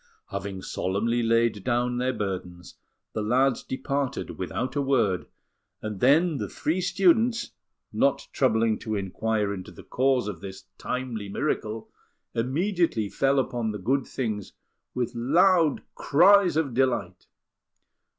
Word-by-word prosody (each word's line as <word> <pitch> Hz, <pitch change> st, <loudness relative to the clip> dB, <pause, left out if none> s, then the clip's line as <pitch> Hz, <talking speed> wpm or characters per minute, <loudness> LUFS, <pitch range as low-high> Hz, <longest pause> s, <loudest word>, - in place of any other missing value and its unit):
Having 100 Hz, -1 st, -5 dB
solemnly 115 Hz, +6 st, -1 dB
laid 115 Hz, -3 st, +2 dB
down 125 Hz, 0 st, 0 dB
their 130 Hz, +1 st, +1 dB
burdens, 90 Hz, -5 st, -5 dB, 0.4 s
the 110 Hz, -, -2 dB
lads 125 Hz, +4 st, +2 dB
departed 135 Hz, 0 st, -3 dB
without 130 Hz, +2 st, -3 dB
a 145 Hz, -, +1 dB
word; 120 Hz, -10 st, +1 dB, 0.5 s
and 105 Hz, -3 st, -5 dB
then 155 Hz, -, +4 dB
the -, -, -4 dB
three 170 Hz, +4 st, -1 dB
students, 215 Hz, +6 st, +2 dB, 0.4 s
not -, -, +1 dB
troubling 110 Hz, -1 st, +2 dB
to 110 Hz, -1 st, -3 dB
inquire 105 Hz, +1 st, -1 dB
into 95 Hz, -2 st, -7 dB
the -, -, -13 dB
cause 130 Hz, -3 st, +1 dB
of 90 Hz, -5 st, -6 dB
this 95 Hz, -1 st, -8 dB, 0.2 s
timely 120 Hz, -5 st, -4 dB
miracle, 110 Hz, -2 st, -2 dB, 0.5 s
immediately 145 Hz, -, 0 dB
fell 135 Hz, +5 st, +1 dB
upon 120 Hz, -4 st, 0 dB
the 105 Hz, -, -4 dB
good 130 Hz, +7 st, 0 dB
things 110 Hz, -6 st, -4 dB, 0.4 s
with 125 Hz, -1 st, -1 dB
loud 160 Hz, +6 st, +3 dB
cries 185 Hz, +3 st, +5 dB
of 145 Hz, -6 st, 0 dB
delight. 120 Hz, -8 st, 0 dB
120 Hz, 130 wpm, -26 LUFS, 105-140 Hz, 0.5 s, cries